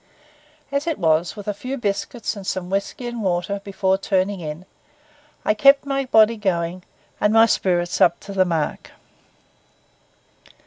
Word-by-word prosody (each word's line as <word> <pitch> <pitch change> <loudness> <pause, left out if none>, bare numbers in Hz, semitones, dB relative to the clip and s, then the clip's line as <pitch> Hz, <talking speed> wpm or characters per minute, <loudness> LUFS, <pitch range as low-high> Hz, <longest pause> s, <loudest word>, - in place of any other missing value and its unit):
As 280 +3 -1
it 325 - -1
was, 165 0 +1
with 205 -1 -9
a 210 - 0
few 255 +7 -5
biscuits 210 +1 -3
and 195 -2 -9
some 185 -1 -3
whisky 200 +5 -3
and 240 -1 -4
water 190 +1 -1
before 190 -1 0
turning 195 0 0
in, 160 +2 -7 0.8
I - - +3
kept 275 +5 +5
my 275 -1 -1
body 225 -2 +4
going 180 -3 -1 0.4
and 210 - +2
my 225 +1 +6
spirits 175 -5 0
up 170 - +4
to 200 0 -8
the 190 -1 +3
mark. 165 -4 -3
200 Hz, 150 wpm, -22 LUFS, 180-225 Hz, 0.8 s, my